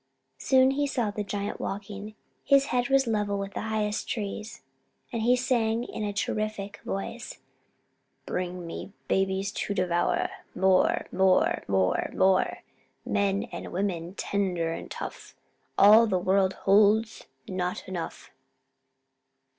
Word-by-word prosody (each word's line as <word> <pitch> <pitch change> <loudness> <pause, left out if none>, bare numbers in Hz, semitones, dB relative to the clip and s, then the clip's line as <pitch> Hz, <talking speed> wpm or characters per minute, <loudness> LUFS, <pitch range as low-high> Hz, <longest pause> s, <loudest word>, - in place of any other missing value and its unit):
Soon 260 0 +4
he 285 +1 0
saw 240 -6 -1
the 210 0 -3
giant 205 0 -4
walking. 205 +1 -6 0.3
His 275 -1 +4
head 245 +1 +1
was 270 0 +4
level 210 -3 0
with 200 0 -5
the - - -3
highest 215 -1 -2
trees, 215 0 -5 0.5
and 230 - -1
he 245 +3 +4
sang 235 -2 +1
in 220 - -5
a 205 - -1
terrific 205 0 -3
voice 230 +5 -5 0.9
"Bring 180 -1 -3
me 170 +4 -7
babies 195 +1 0
to 200 - -3
devour; 175 -2 +1 0.3
More 190 0 +3
more 190 0 +3
more 95 -1 +1
more 190 0 +2 0.4
Men 200 0 +1
and - - -7
women, 180 -2 -2
tender 180 -6 -1
and - - -7
tough; - - -8 0.4
All 215 +3 +8
the 190 -3 +1
world 190 +1 +2
holds 210 +3 +3 0.2
not 180 -1 -3
enough." 180 -3 -6
200 Hz, 130 wpm, -27 LUFS, 190-220 Hz, 0.9 s, All